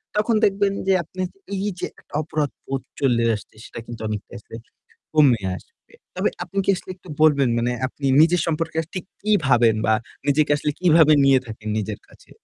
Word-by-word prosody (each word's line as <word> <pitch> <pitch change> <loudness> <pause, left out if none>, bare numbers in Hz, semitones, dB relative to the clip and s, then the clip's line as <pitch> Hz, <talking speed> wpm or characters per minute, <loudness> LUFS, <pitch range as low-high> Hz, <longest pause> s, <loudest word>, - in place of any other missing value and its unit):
তখন 215 +2 +2
দেখবেন 200 0 +1
যে 190 - +4
আপনার 185 +3 -4 0.3
এই 195 +2 -2
যে - - -2
একটা - - -25
অপরাধবোধ 145 -3 -3 0.2
চলে 120 -4 +2
আসছে 105 - -11
সেটা - - -9
কিন্তু 120 -1 -9
অনেকটা 105 -1 -5
আসলে 110 - -12 0.6
কমে 135 -9 +4
আসবে। - - -19 0.2
তবে - - +1 0.2
আপনি 200 - -6
কি - - +3
আসলে 185 - -10
একটু 185 - -18
বলবেন, 140 -4 +4
মানে 120 +1 0
আপনি 140 +1 -6
নিজের 170 +1 +4
সম্পর্কে 165 0 -2
আসলে 165 - -9
ঠিক 180 - -4 0.2
কি 215 0 +1
ভাবেন 115 -4 +4
বা 110 - +4 0.3
নিজেকে 145 +1 +2
আসলে 150 +1 -1
কিভাবে 160 -3 +6
নিয়ে 135 -1 +6
থাকেন 110 -1 -8
নিজের 105 0 -4
কাছে? - - -21
150 Hz, 185 wpm, -22 LUFS, 120-175 Hz, 0.6 s, কিভাবে